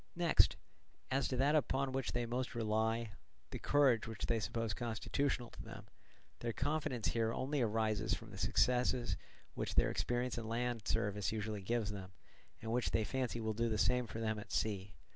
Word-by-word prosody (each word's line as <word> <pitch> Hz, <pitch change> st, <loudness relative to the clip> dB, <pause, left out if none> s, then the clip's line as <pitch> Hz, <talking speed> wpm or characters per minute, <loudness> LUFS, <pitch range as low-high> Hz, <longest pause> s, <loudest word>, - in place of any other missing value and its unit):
Next, 170 Hz, -2 st, +4 dB, 0.6 s
as 135 Hz, +1 st, +2 dB
to 130 Hz, -, -2 dB
that 140 Hz, +3 st, +4 dB
upon 135 Hz, -3 st, +2 dB
which 135 Hz, -1 st, -1 dB
they 120 Hz, 0 st, 0 dB
most 125 Hz, +2 st, -2 dB
rely, 110 Hz, 0 st, +1 dB, 0.4 s
the -, -, -4 dB
courage 135 Hz, -7 st, +4 dB
which 110 Hz, -2 st, -4 dB
they 115 Hz, -1 st, +1 dB
suppose 115 Hz, 0 st, -1 dB
constitutional 120 Hz, +2 st, -1 dB
to -, -, -9 dB
them, 110 Hz, -2 st, -9 dB, 0.5 s
their 115 Hz, -1 st, -2 dB
confidence 135 Hz, -4 st, 0 dB
here 115 Hz, -1 st, +1 dB
only 135 Hz, +4 st, -1 dB
arises 110 Hz, -1 st, +1 dB
from 115 Hz, -2 st, -10 dB
the 100 Hz, -, -9 dB
success 125 Hz, +4 st, +3 dB, 0.6 s
which -, -, -3 dB
their -, -, +4 dB
experience 120 Hz, 0 st, -1 dB
in 110 Hz, -, -5 dB
land 120 Hz, 0 st, -1 dB
service 100 Hz, -1 st, 0 dB
usually 105 Hz, -1 st, -3 dB
gives 110 Hz, +1 st, 0 dB
them, 95 Hz, -2 st, -7 dB, 0.5 s
and 110 Hz, -, -3 dB
which 120 Hz, +1 st, +1 dB
they 110 Hz, -, +2 dB
fancy 125 Hz, +1 st, -1 dB
will 110 Hz, -1 st, -1 dB
do 115 Hz, +2 st, 0 dB
the 110 Hz, -, 0 dB
same 125 Hz, +4 st, +2 dB
for 110 Hz, -, -6 dB
them 110 Hz, -1 st, -1 dB
at 105 Hz, -, -10 dB
sea. 100 Hz, -2 st, -1 dB
115 Hz, 180 wpm, -37 LUFS, 110-125 Hz, 0.6 s, Next